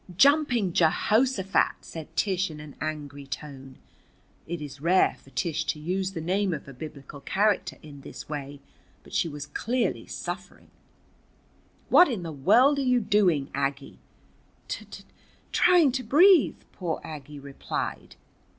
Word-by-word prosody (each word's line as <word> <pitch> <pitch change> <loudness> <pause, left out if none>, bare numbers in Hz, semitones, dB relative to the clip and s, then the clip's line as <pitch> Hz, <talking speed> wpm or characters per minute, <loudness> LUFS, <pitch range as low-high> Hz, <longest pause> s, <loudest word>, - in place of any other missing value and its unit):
"Jumping 245 - +4
Jehoshaphat!" 200 +5 +2
said 160 -2 -10
Tish 190 -2 +1
in 155 -1 -9
an 150 -2 -11
angry 145 -2 -5
tone. 135 0 -8 0.7
It 170 +1 -4
is 145 -2 -9
rare 180 +4 +3
for - - -17
Tish 170 -4 -2
to 150 - -2
use 185 +4 -2
the 165 - -4
name 185 +2 0
of 145 - -9
a 140 - -9
Biblical 140 +1 -9
character 205 +6 0
in 145 -2 -11
this - - -10
way, 145 -1 -6 0.4
but - - -16
she 170 - +1
was 145 -1 -6
clearly 235 +11 -2
suffering. - - -7 1.2
"What 355 - +7
in 220 -9 -3
the 165 - -5
world 250 - +4
are - - +1
you 250 -2 +3
doing, 190 -10 +2
Aggie?" 140 0 -3 0.7
"T - - -5
t - - -11 0.5
trying 350 -6 +5
to 260 +1 -2
breathe," 330 - +5 0.2
poor 175 -4 -3
Aggie 150 -1 -9
replied. 140 0 -5
165 Hz, 145 wpm, -27 LUFS, 145-215 Hz, 1.2 s, What